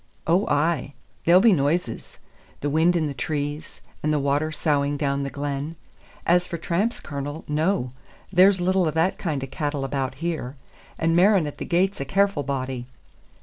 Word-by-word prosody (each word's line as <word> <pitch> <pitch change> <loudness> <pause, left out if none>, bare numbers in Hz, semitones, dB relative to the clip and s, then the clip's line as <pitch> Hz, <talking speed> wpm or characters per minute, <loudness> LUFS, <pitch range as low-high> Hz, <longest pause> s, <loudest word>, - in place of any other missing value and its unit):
ou 175 +5 +2
ay, 145 -2 0 0.3
there'll 175 +2 +7
be 220 +1 +6
noises, 145 -4 -1 0.4
the 145 - -1
wind 165 +4 +3
in 165 -2 +1
the 145 - -3
trees, 145 +3 -4 0.2
and 155 - 0
the 150 - +2
water 145 +2 0
soughing 145 -2 0
down 140 -1 0
the 140 - -2
glen. 145 +2 -4 0.5
As 180 +1 +3
for 170 - -4
tramps, 180 +8 -1
Cornel, 145 +1 -6
no, 150 -3 0 0.4
there's 190 +1 +6
little 185 0 +2
o' - - +1
that 170 +4 +1
kind 150 -7 -2
o' - - -4
cattle 145 0 -3
about 135 -1 -2
here; 155 -4 -3 0.4
and 165 0 +1
Merran 190 -1 +5
at 145 - -7
the - - -4
gate's 185 0 +1
a - - -2
careful 195 +1 +2
body." 130 -2 -3
155 Hz, 175 wpm, -24 LUFS, 140-175 Hz, 0.5 s, there'll